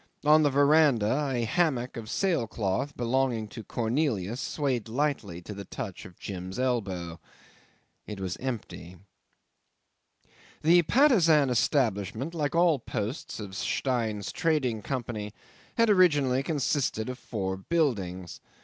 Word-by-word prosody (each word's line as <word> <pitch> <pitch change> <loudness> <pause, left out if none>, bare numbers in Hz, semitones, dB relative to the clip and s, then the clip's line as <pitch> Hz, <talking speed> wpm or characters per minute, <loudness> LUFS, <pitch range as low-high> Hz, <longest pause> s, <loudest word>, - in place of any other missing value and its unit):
On 155 +1 +6
the 145 - +4
verandah 140 -2 +3
a 120 -2 0
hammock 135 -4 0
of 110 -2 -7
sail 170 - 0
cloth, 110 +7 -2
belonging 120 -2 0
to 115 - -8
Cornelius, 115 - -1
swayed 130 -7 -2
lightly 115 - -2
to 105 - -7
the 100 0 -7
touch 100 -1 -7
of 90 - -13
Jim's 95 -1 -6
elbow. 95 -10 -2 0.9
It 105 -2 -6
was 95 -1 -3
empty. 110 -8 -6 1.7
'The 170 +3 +6
Patusan 165 - +4
establishment, 120 - 0
like 150 -2 -1
all 170 -4 +4
the - - -16
posts 110 +4 -4
of 100 -3 -7
Stein's 110 -3 -1
Trading 135 -9 0
Company, 110 -4 -4 0.4
had 230 0 +4
originally 145 -10 +4
consisted 140 -6 -1
of 125 0 -5
four 95 -6 -3
buildings. 95 - -2
125 Hz, 125 wpm, -28 LUFS, 105-150 Hz, 1.7 s, On